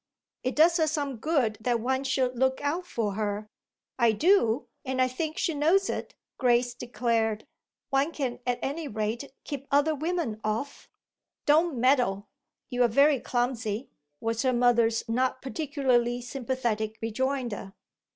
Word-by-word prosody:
"It 255 +1 -2
does 330 +3 +5
her 320 -2 +2
some 285 -4 -2
good 230 -5 0
that 240 +1 +1
one 260 +3 0
should 260 -2 0
look 260 +2 +1
out 325 +5 -1
for 215 - -2
her. 210 0 -3 0.5
I 235 -2 +4
do, 285 - +3 0.2
and 260 -2 -3
I 255 - +4
think 310 +5 -4
she 330 - 0
knows 330 +7 +3
it," - - -5 0.2
Grace 245 -1 +3
declared. 230 -3 -1 0.5
"One 275 +4 +2
can 265 -6 -3
at 245 -1 +1
any 295 +3 -3
rate 220 +3 -3
keep 280 -1 -6
other 290 +3 +3
women 310 -7 -2
off." 225 +7 -3 0.6
"Don't 310 0 +3
meddle 240 -6 +2 0.4
you're 245 -1 +3
very 280 +4 +4
clumsy," 240 -2 -2 0.3
was 225 0 -1
her 260 -1 +2
mother's 235 -2 +3
not 255 +3 0
particularly 260 -4 0
sympathetic 240 -4 -2
rejoinder. 235 -3 -2
255 Hz, 140 wpm, -28 LUFS, 230-285 Hz, 0.6 s, does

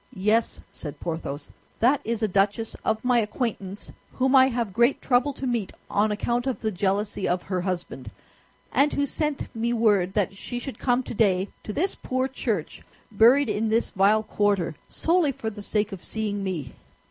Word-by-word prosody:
"Yes," 215 +4 +1
said 150 -3 -5
Porthos, 160 -4 -5 0.3
"that 255 +5 +4
is 230 0 -2
a - - +3
duchess 200 +3 0
of 220 +2 -1
my 245 -1 +4
acquaintance 210 -3 -3 0.2
whom 265 +1 +2
I 260 0 +8
have 235 -6 -2
great 235 +5 +3
trouble 250 +2 +2
to 270 - -6
meet 235 -6 -1 0.2
on 210 +1 +2
account 240 +4 -1
of 260 - -1
the 220 - 0
jealousy 200 +1 -1
of 180 0 0
her 185 -2 -2
husband, 175 - -4 0.6
and 280 +3 +3
who 285 - +1
sent 290 -2 -2
me 235 +1 0
word 205 -5 +2
that 200 -2 0
she 220 +4 -6
should 255 +2 -6
come 250 0 +1
today 200 -5 +1
to - - -6
this 355 - 0
poor 255 0 -2
church, 225 - -3 0.3
buried 240 +7 +5
in 215 +1 0
this 225 +2 +1
vile 205 +3 +3
quarter, 205 -6 +1 0.2
solely 335 -3 +2
for 225 -4 -5
the 205 -1 -9
sake 210 +1 -1
of 195 -3 -8
seeing 210 -2 -3
me." 165 -10 -4
220 Hz, 180 wpm, -25 LUFS, 195-245 Hz, 0.6 s, I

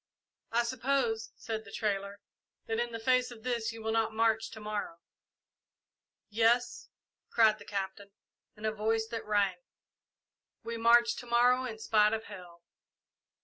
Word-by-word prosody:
"I 235 +1 +2
suppose," 235 -2 0
said 220 -1 -5
the 200 - -13
trader, 200 -1 -2 0.5
"that 225 0 -2
in 240 0 -1
the 230 - -4
face 255 +2 +2
of 235 -3 -12
this 235 -3 -1
you 225 -1 -9
will 220 - -1
not 225 0 0
march 225 0 +2
to 220 - -10
morrow." 210 -5 -4 1.3
"Yes," 230 +3 +1 0.4
cried 215 -2 +4
the 205 - -12
Captain, 200 0 -5 0.5
in 215 0 -8
a 215 - +1
voice 220 +1 0
that 230 -2 -5
rang; 200 -3 +2 1.1
"we 230 - -4
march 235 +1 +5
to 245 - -8
morrow 245 +2 +4
in 225 -3 -5
spite 215 -1 +3
of 220 0 -2
hell!" 180 -5 -12
225 Hz, 150 wpm, -31 LUFS, 210-235 Hz, 1.3 s, march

